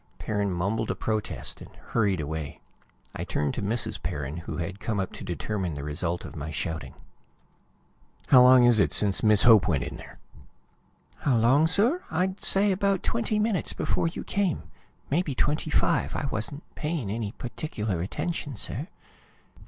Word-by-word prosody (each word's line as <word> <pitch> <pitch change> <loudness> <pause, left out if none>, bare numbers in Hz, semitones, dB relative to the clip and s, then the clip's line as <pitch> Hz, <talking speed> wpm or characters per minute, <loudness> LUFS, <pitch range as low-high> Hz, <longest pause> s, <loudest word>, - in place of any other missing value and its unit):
Perrin 105 -2 -1
mumbled 100 +6 -1
a - - 0
protest 110 -2 -2
and - - -10
hurried 100 -5 0
away. 75 -1 -5 0.6
I - - -3
turned 75 -1 -1
to - - -4
Mrs. 110 +3 -1
Perrin, 75 +2 -4
who 85 - -6
had 95 +3 -4
come 110 -3 -2
up 95 - -3
to - - -8
determine 95 -1 -3
the 70 - -6
result 85 +4 -3
of - - -9
my 75 0 -5
shouting. 75 -3 -4 1.3
"How 125 - +8
long 125 0 +7
is 120 -2 +6
it - - +3
since 100 -3 +3
Miss 105 -2 +5
Hope 110 -6 +7
went 70 -8 +1
in - - -6
there?" - - -12 1.0
"How 130 -4 +2
long, 130 +8 +4
sir? 235 - +2
I'd 185 +4 -1
say 200 +1 +4
about 195 0 +1
twenty 225 -2 0
minutes 210 -3 0
before - - 0
you 165 - -5
came. 195 -6 -1 0.5
Maybe 150 -2 0
twenty 150 +4 0
five. - - +1
I - - -2
wasn't 140 +8 -4
paying 150 -10 -3
any 110 -1 -3
particular 110 - -4
attention, 145 - -3
sir. 125 +8 -3
110 Hz, 165 wpm, -27 LUFS, -, 1.3 s, How